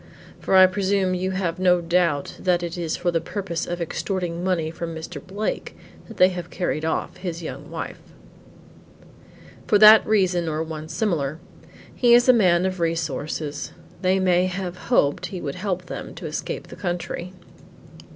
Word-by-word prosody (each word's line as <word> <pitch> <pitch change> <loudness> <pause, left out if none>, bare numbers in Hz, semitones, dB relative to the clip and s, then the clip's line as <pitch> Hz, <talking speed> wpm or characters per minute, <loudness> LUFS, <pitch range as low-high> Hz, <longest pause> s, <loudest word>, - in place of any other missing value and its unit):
For - - 0
I 185 0 +9
presume 190 0 +1
you 185 +1 -1
have 185 -2 -2
no 180 -1 +4
doubt 170 -4 0
that 175 -2 +1
it 170 -1 -4
is 170 -3 -2
for 175 0 0
the 165 -1 0
purpose 170 -1 -4
of 175 0 -3
extorting 175 0 -3
money 170 -4 0
from 165 0 -6
Mr. 160 -2 -7
Blake 205 +3 -4 0.3
that - - -11
they 185 - +6
have 175 -2 -6
carried 175 -4 -2
off 160 +3 -2
his 175 -2 -5
young - - -7
wife." - - -6 1.7
"For 210 - +5
that 215 +1 +9
reason 180 -5 +2
or 155 +1 -1
one 160 -1 -7
similar. 160 -6 -1 0.6
He 240 -1 +5
is 240 +1 +4
a 255 - +8
man 180 -6 +3
of 185 -1 -2
resources, 155 -2 -3 0.3
they 185 0 +2
may 180 -1 +3
have 185 -1 -4
hoped 145 - +2
he 185 - -6
would 140 -4 -4
help 185 0 -3
them - - -7
to - - -8
escape - - -5
the - - -9
country." 175 0 -4
175 Hz, 170 wpm, -23 LUFS, 165-190 Hz, 1.7 s, I